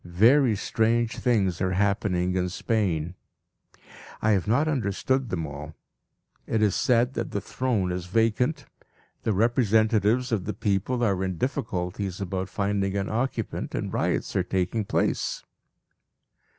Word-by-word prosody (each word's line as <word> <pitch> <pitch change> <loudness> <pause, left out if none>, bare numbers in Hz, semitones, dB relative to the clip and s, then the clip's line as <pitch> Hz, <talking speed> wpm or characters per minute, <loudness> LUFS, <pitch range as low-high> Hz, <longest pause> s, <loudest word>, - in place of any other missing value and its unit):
Very 115 +8 +4
strange 115 +2 0
things 100 -8 +1
are 95 0 +1
happening 95 -2 +1
in 90 -1 0
Spain. 90 -5 -1 1.1
I 110 - +2
have 100 -2 +1
not 135 +8 +2
understood 130 -1 0
them 85 -3 -2
all. 75 +1 -8 0.7
It 110 -1 +1
is 105 -3 +3
said 125 +1 +2
that - - -3
the 100 - -2
throne 105 -3 -1
is 90 0 -4
vacant, 115 - +1 0.6
the 110 - 0
representatives 110 +2 +2
of 105 -6 0
the 105 - -3
people 105 +5 0
are 100 -4 +1
in 95 -2 -2
difficulties 95 - -3
about 95 -1 -3
finding 100 -1 -1
an 100 0 -2
occupant, 115 -1 -2
and - - -3
riots - - -1
are - - +3
taking 95 +3 -1
place. - - -1
105 Hz, 135 wpm, -26 LUFS, 95-115 Hz, 1.1 s, Very